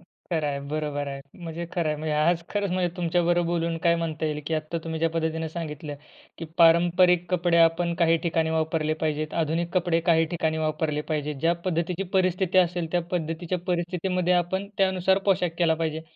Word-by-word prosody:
खरं 170 -2 -4
आहे, 140 -1 -3
बरोबर 150 -1 -2
आहे. 140 0 -6 0.2
म्हणजे 170 -1 -6
खरं 170 -3 0
आहे. 150 - -1
म्हणजे 155 0 -3
आज 165 +3 +2
खरंच 205 -2 -1
म्हणजे 180 -1 -1
तुमच्याबरोबर 175 0 +1
बोलून, 170 -1 -1
काय 170 +1 +3
म्हणता 160 -1 -3
येईल 150 -1 -2
की 165 - 0
आत्ता 155 +2 -3
तुम्ही 160 -1 -3
ज्या 165 - +3
पद्धतीनं 160 0 -2
सांगितलं 155 -2 -6 0.4
की 165 - -5
पारंपरिक 175 +1 +5
कपडे 175 -1 +2
आपण 165 +1 +3
काही 165 0 +3
ठिकाणी 165 -1 0
वापरले 160 -1 0
पाहिजेत, 155 0 -1
आधुनिक 165 +2 -1
कपडे 175 -2 +2
काही 165 -1 +5
ठिकाणी 160 -2 -1
वापरले 155 -1 -1
पाहिजेत. 150 -1 -1
ज्या 165 +2 +3
पद्धतीची 180 +1 -1
परिस्थिती 185 0 +2
असेल 175 -2 +1
त्या 175 - +2
पद्धतीच्या 175 +1 -2
परिस्थितीमध्ये 180 0 0
आपण 190 +3 0
त्यानुसार 190 0 +3
पोशाख 185 -3 +2
केला 165 -2 +3
पाहिजे. 160 -1 -3
165 Hz, 180 wpm, -25 LUFS, 160-175 Hz, 0.4 s, पारंपरिक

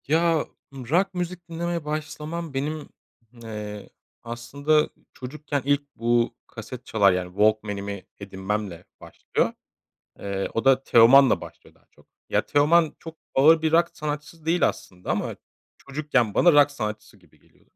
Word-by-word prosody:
Ya, 165 +1 +2 0.3
rock 165 +10 0
müzik 180 -1 -5
dinlemeye 170 -1 -3
başlamam 155 +1 -5
benim, 150 +3 -3 0.5
ııı, 105 -2 -7 0.3
aslında 140 +6 0 0.2
çocukken 145 +2 -4
ilk 145 0 0
bu, 120 +1 +1
kaset 115 +2 -9
çalar 100 -3 +4
yani, 90 0 -2
Walkman'imi 100 0 0 0.2
edinmemle 95 -2 -4 0.2
başlıyor. - - -2 0.7
Eee, 100 -1 -3
o 115 - -2
da 135 0 +5
Teoman'la 130 +2 +6
başlıyor - - -13
daha - - -30
çok. - - -24 0.2
Ya, - - +2
Teoman 155 +2 +3
çok 165 -1 -10 0.2
ağır 155 +4 +6
bir 160 -1 +1
rock 170 +1 +4
sanatçısı 150 +2 -6
değil 170 +1 +3
aslında 90 -1 -7
ama - - -2 0.4
çocukken 135 -6 -1
bana 175 - +5
rock 145 0 +6
sanatçısı 110 -6 -6
gibi - - -26
geliyordur. - - -30
140 Hz, 135 wpm, -24 LUFS, 110-155 Hz, 0.7 s, Teoman'la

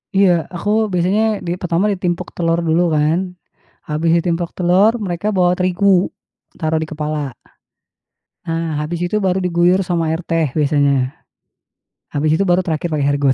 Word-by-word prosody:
Iya, 195 -1 +5 0.3
aku 175 +4 -3 0.2
biasanya 185 +4 +1 0.3
di - - -1
pertama 180 +2 0
ditimpuk 180 -2 -2
telur 165 -1 +1
dulu 160 +2 +3
kan, 150 +3 +2 0.7
habis 155 +2 0
ditimpuk 170 0 -1
telur 185 +4 +4
mereka 175 +2 -3
bawa 180 -1 +3
terigu, 185 +2 +1 0.7
taruh 160 -1 0
di - - -7
kepala. 150 -3 -3 1.1
Nah, 165 -2 -2
habis 170 +2 -4
itu 175 +4 -1
baru 190 -2 +1
diguyur 180 +1 +2
sama 165 -3 0
air 165 - -3
teh 165 -3 0
biasanya. 140 -3 +1 1.0
Habis 155 +2 +1
itu - - +3
baru 180 +1 +3
terakhir 165 -1 -2
pakai 145 -2 0
air 145 - +1
got. 140 -2 +3
170 Hz, 155 wpm, -18 LUFS, 155-180 Hz, 1.1 s, Iya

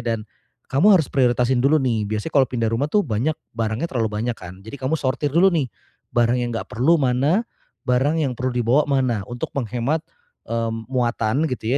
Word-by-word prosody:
dan 115 -2 -2 0.5
kamu 190 +10 +6
harus 155 - 0
prioritasin 125 -1 +2
dulu 145 +3 +4
nih, 115 -6 0
biasanya 110 +9 -3
kalau 135 -4 +4
pindah 115 -3 -1
rumah 135 +6 0
tuh 205 +1 +3
banyak 120 +8 0 0.2
barangnya 115 +7 -1
terlalu 115 -4 0
banyak 115 +3 -2
kan, 90 +1 -10
jadi 110 - -8
kamu 135 +5 0
sortir 135 +2 -1
dulu 180 +5 +4
nih 150 -7 0 0.5
barang 120 +1 +3
yang 120 - -2
nggak - - -3
perlu 130 +10 +3
mana, 140 - +2 0.4
barang 135 +6 +2
yang 140 -4 0
perlu 130 0 -1
dibawa 120 +4 +3
mana, 130 -6 +1
untuk 120 - -4
menghemat, 130 +5 -1 0.5
mmm, 115 -1 -2
muatan 120 +1 0
gitu 125 -3 -4
125 Hz, 185 wpm, -22 LUFS, 115-140 Hz, 0.5 s, kamu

